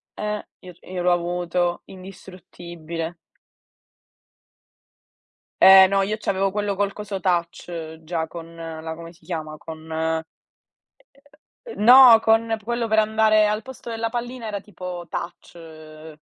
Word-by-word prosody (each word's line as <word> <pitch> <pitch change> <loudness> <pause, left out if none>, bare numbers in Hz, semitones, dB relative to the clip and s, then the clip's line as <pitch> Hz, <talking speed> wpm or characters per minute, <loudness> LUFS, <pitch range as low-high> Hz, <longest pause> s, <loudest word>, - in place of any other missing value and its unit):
eh, 210 0 -4
io 180 - -12
r - - -28
io 185 -1 -4
l'ho 180 - +2
avuto, 175 0 -1
indistruttibile. 175 -3 -9 2.5
Eh, 190 0 +9
no, 195 0 +2
io 210 +2 -1
c'avevo 195 -2 -1
quello 205 -1 -2
col 200 0 0
coso 205 -2 -6
touch 170 -2 -3
già 160 0 -3
con 165 0 -10
la 160 -1 -7
come 165 0 -10
si 170 - -23
chiama? 155 -3 -5
Con 160 0 -4 1.4
N 210 - -5
no, 245 -1 +9
con 225 0 +2
quello 235 +1 -2
per 220 0 +3
andare 215 0 +3
al 210 +1 -1
posto 260 -2 -10
della 225 0 -3
pallina 240 0 -5
era 205 -2 -4
tipo 180 -3 -8
touch, 175 0 -7
ehm 155 -1 -13
180 Hz, 135 wpm, -22 LUFS, 165-210 Hz, 2.5 s, Eh